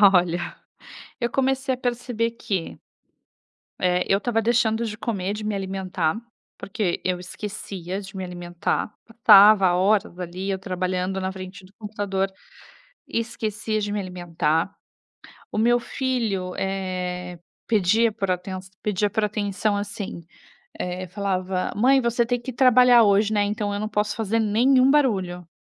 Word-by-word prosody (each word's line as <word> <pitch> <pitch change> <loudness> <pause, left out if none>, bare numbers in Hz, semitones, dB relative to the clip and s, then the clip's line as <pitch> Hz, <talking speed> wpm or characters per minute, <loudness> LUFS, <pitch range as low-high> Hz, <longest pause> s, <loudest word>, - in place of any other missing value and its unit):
Olha, 175 0 +1 0.7
eu 235 0 0
comecei 265 0 +1
a - - -7
perceber 240 -2 -1
que, 195 -7 -4 1.0
eh, 180 0 +1
eu 195 - +5
estava 225 +1 0
deixando 230 0 +2
de 215 -1 -5
comer, 200 -4 -2
de 210 0 -6
me 210 -1 -1
alimentar, 190 -3 -2 0.4
porque 195 -3 -2
eu 180 -1 0
esquecia 190 0 -6
de 195 0 -11
me 190 - -3
alimentar. 175 +2 -3
Passava 210 -4 +7
horas 190 0 +2
ali 180 +2 -5
eu 190 - 0
trabalhando 185 0 -2
na 190 0 -2
frente 185 0 -9
do 195 - -20
computador, 200 -3 -2 0.8
esquecia 220 -2 -2
de 205 - -2
me 205 - -1
alimentar. 175 -2 -1 0.8
O - - -3
meu 240 +2 +4
filho, 225 -9 -2
eh, 180 -2 -3 0.3
pedia 220 +2 +3
por 195 -2 -2
atenção 185 +1 -4
pedia 210 0 +1
por 215 +1 0
atenção, 205 0 -1
assim, 200 -3 -5 0.6
eh, 180 +1 -4
falava: 185 -1 -2
"Mãe, 265 +5 +4
você 235 -1 +1
tem 245 0 -1
que 260 +1 -6
trabalhar 250 -1 +6
hoje, 205 +1 +3
né, 205 -1 +3
então 205 0 -2
eu 205 - -3
não 215 - -2
posso 210 0 -1
fazer 225 0 0
nenhum 255 +5 +4
barulho". 190 - +1
205 Hz, 145 wpm, -24 LUFS, 185-225 Hz, 1.0 s, Passava